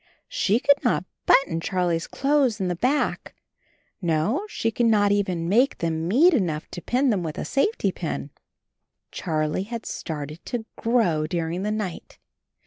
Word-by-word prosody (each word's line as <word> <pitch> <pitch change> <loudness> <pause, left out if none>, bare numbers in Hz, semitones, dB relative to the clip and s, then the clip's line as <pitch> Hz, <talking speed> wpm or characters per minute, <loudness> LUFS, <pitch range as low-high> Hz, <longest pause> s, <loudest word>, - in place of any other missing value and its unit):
She 215 +4 +1
could 285 +2 +3
not 235 -7 +1 0.2
button 165 -12 +4
Charlie's 175 -2 -1
clothes 275 -5 +1
in 185 -2 -1
the 180 - -1
back! 255 - -1 0.7
No, 180 - 0
she 225 - -1
could 235 +1 +1
not 205 -2 +4
even 185 -5 0
make 240 +9 +3
them 165 -1 -2
meet 300 - +5
enough 170 - 0
to 175 - -6
pin 255 +5 +1
them 200 -4 0
with 160 -3 -5
a - - -3
safety 420 +12 +1
pin. - - -5 0.8
Charlie 155 -1 -1
had 235 -2 -5
started 150 0 -6
to 240 -3 -3
grow 195 -10 +1
during 170 +1 -2
the 210 - -1
night. 210 -5 -4
195 Hz, 155 wpm, -24 LUFS, 165-245 Hz, 0.8 s, meet